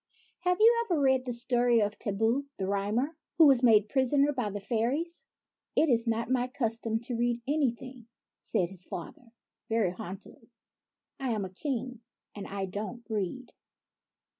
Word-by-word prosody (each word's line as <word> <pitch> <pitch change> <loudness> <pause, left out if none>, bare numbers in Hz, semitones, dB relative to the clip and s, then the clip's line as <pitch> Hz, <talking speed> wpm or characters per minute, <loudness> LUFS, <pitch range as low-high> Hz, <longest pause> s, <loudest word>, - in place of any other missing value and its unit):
" - - -33
Have 360 0 +3
you 465 +2 +6
ever 355 -9 0
read 265 -2 +3
the 250 - -2
story 240 0 +2
of 205 0 0
Thibaut, 225 +7 0
the 190 - -2
Rhymer, 210 +10 -1 0.2
who 325 - +8
was 270 -4 +6
made 220 -4 +5
prisoner 275 +4 +2
by 250 -6 -2
the 205 +1 -5
fairies? 255 - -2
" - - -62
" - - -57
It 320 - +5
is 230 0 +2
not 230 0 0
my 250 -1 +2
custom 230 -3 -1
to 240 0 -3
read 240 0 0
anything," 255 -4 -2 0.3
said 175 -2 -1
his 185 -2 -5
father, 225 +6 -8 0.4
very 220 -5 +2
haughtily. 185 +2 -9 0.4
" - - -58
I 265 -2 -2
am 210 -3 -2
a 185 - -9
King, 250 0 -4 0.3
and 205 - -7
I 195 -1 -3
don't 210 +5 -6
read." 220 +4 -3
235 Hz, 175 wpm, -29 LUFS, 210-265 Hz, 0.4 s, who